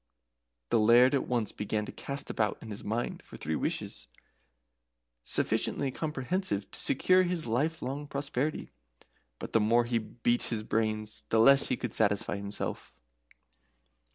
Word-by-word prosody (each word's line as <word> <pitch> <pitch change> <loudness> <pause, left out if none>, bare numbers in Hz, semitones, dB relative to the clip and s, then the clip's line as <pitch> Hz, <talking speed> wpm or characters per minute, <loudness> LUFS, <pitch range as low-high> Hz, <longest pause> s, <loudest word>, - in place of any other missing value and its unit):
The - - +4
Laird 120 +5 +6
at 140 - 0
once 120 -4 0
began 105 +1 -2
to - - -7
cast 140 +1 -4
about 110 -2 0
in 110 - -9
his 105 - -7
mind 115 +3 -3
for - - -12
three 80 +1 -2
wishes - - -3 1.1
sufficiently 135 - 0
comprehensive 150 - -2
to - - -8
secure 185 +7 +3
his 180 -2 -1
lifelong 145 +3 -2
prosperity; 140 +1 -3 0.7
but - - -8
the 115 - +5
more 115 +3 +3
he 120 0 0
beat 120 +2 -1
his 110 -2 -1
brains 110 -1 -2
the 115 - +2
less 135 +5 +7
could 125 - -2
he 120 - 0
satisfy 105 -2 +1
himself. 100 -10 -5
120 Hz, 145 wpm, -30 LUFS, 110-140 Hz, 1.1 s, less